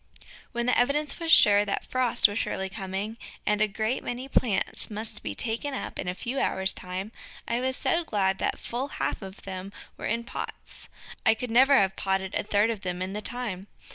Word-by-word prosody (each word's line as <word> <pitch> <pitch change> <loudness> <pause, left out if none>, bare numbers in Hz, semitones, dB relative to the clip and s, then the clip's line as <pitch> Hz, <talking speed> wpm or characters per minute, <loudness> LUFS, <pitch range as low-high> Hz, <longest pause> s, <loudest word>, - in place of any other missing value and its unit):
When 240 -1 -1
the 250 - +3
evidence 280 +5 +1
was 330 -1 -1
sure 205 -6 +8
that 200 -1 -2
frost 255 -2 +3
was 205 +1 -3
surely 190 0 -2
coming, 195 +2 -4 0.3
and 210 0 +2
a 215 - +5
great 220 +4 -1
many 250 +2 -4
plants 225 -7 +1
must 215 0 -3
be - - -4
taken 245 +5 0
up - - -5
in 180 - -3
a 180 - -1
few 250 +7 -3
hours' 190 0 +2
time, 185 +3 -5 0.4
I 235 - 0
was 260 +1 -1
so 335 +1 +2
glad 195 -8 0
that - - 0
full 250 +4 -3
half - - -1
of 190 0 -9
them 190 0 -6 0.3
were - - -4
in 230 +2 0
pots. 235 - -8 0.3
I 225 -2 +5
could 245 +1 -5
never 265 +4 +6
have 190 -3 +3
potted 190 0 -1
a - - +1
third 210 +2 +2
of 215 -4 -5
them 180 0 -3
in 190 +1 -4
the 210 - -3
time. 210 -5 -3
215 Hz, 205 wpm, -27 LUFS, 195-245 Hz, 0.4 s, sure